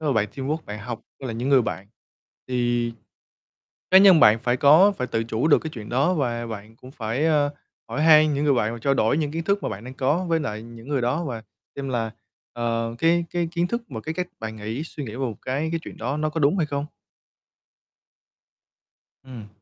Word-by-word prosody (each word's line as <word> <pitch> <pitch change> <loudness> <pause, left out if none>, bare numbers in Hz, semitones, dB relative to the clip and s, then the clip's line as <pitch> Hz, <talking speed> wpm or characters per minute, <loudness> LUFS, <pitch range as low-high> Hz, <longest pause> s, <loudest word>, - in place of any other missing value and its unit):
nếu 150 -2 0
mà - - -3
bạn 105 -1 +1
teamwork, 140 +4 -2
bạn 105 +1 -6
học 115 +2 -6 0.2
với 135 - -5
lại 115 - -4
những 120 +4 -3
người 135 -3 +5
bạn, 100 -3 -4 0.6
thì 120 -2 0 1.0
cá 190 - +9
nhân 190 -4 +7
bạn 110 -1 +7
phải 120 +1 0
có 160 +9 +6
phải 125 -9 -3
tự 115 -2 -1
chủ 115 +6 -1
được 150 - +6
cái 160 - -6
chuyện 110 -6 -8
đó. 140 +9 +2
Và 120 -6 -1
bạn 110 0 -8
cũng 125 +2 -13
phải, 120 +2 -2
ơ, 150 -3 +3 0.4
hỏi 150 - -2
hay 155 -1 +7
những 145 0 0
người 145 -2 +4
bạn, 110 -2 0
và 115 - -6
trao 135 +4 +1
đổi 115 +1 +2
những 150 -3 -1
kiến 165 +1 -3
thức 200 +1 +1
mà - - -1
bạn 100 +3 -7
đang 130 +1 -8
có 145 +8 0
với 165 -1 +1
lại 110 -7 -4
những 115 +2 -12
người 140 -4 0
đó, 135 +8 0
và 120 -7 -5 0.3
xem 140 -1 -4
là, 115 -3 -1 0.4
ờ, 115 -1 -2
cái 170 +3 +3
cái 175 -1 -1
kiến 170 0 +1
thức 235 +5 -3
và 110 - -6
cái 160 +7 -5
cách 180 0 -3
bạn 110 0 -5
nghĩ, 110 +6 -4
suy 150 -3 -7
nghĩ 115 - -6
về - - -7
một 125 -6 -2
cái 140 +5 -2
cái 165 - -1
chuyện - - -10
đó, 140 - -3
nó 155 0 -1
có 160 - -3
đúng 150 +6 +3
hay 160 - +1
không. 145 0 -3 2.4
Ừm. 120 -6 -10
130 Hz, 230 wpm, -24 LUFS, 115-155 Hz, 2.4 s, cá